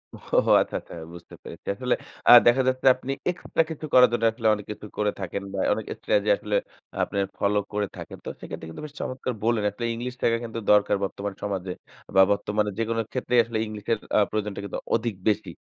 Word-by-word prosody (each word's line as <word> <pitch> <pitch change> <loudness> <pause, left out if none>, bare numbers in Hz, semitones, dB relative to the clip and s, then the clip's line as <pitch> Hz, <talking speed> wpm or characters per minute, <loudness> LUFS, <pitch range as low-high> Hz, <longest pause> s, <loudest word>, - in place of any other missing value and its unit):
ওহ - - 0
আচ্ছা, - - -3
আচ্ছা। - - -14 0.2
বুঝতে 85 0 -12
পেরেছি। 85 - -11
আসলে 125 +4 0 0.4
আ - - +11 0.2
দেখা 120 +3 +5
যাচ্ছে 130 +1 0
আপনি 130 +1 -5 0.2
এক্সট্রা 175 -2 0
কিছু 155 0 -6
করার 125 0 +8
জন্য 115 -1 0
আসলে 115 0 -2
অনেক 105 -1 -4
কিছু 105 0 -8
করে 105 -1 +1
থাকেন। 100 +1 -4
বা 95 - -3
অনেক 110 - -4
স্ট্র্যাটেজি - - 0
যে - - +7
আসলে - - -3 0.5
আপনার 100 -1 -1
ফলো 105 +1 +1 0.2
করে 105 -1 0
থাকেন। - - -8
তো - - -3
সেক্ষেত্রে 80 - -8
কিন্তু 80 - -9
বেশ 145 - -10
চমৎকার 130 0 -3
বললেন 115 -2 +2
আসলে 120 +4 -5
ইংলিশ 125 +2 -4
শেখা 115 0 +3
কিন্তু 115 0 -5
দরকার 105 -1 +4
বর্তমানে 100 0 -4
সমাজে। 95 -2 -3 0.4
বা 95 - +8
বর্তমানে 105 +1 0
যেকোনো 115 0 0
ক্ষেত্রেই 125 -1 +1
আসলে 115 -1 -4
ইংলিশের 105 +1 -2 0.2
আ - - +6
প্রয়োজনটা 105 -2 -3
কিন্তু 100 - -4 0.2
অধিক 115 -1 -1 0.2
বেশি। 105 - -1
110 Hz, 200 wpm, -25 LUFS, 100-120 Hz, 0.5 s, আ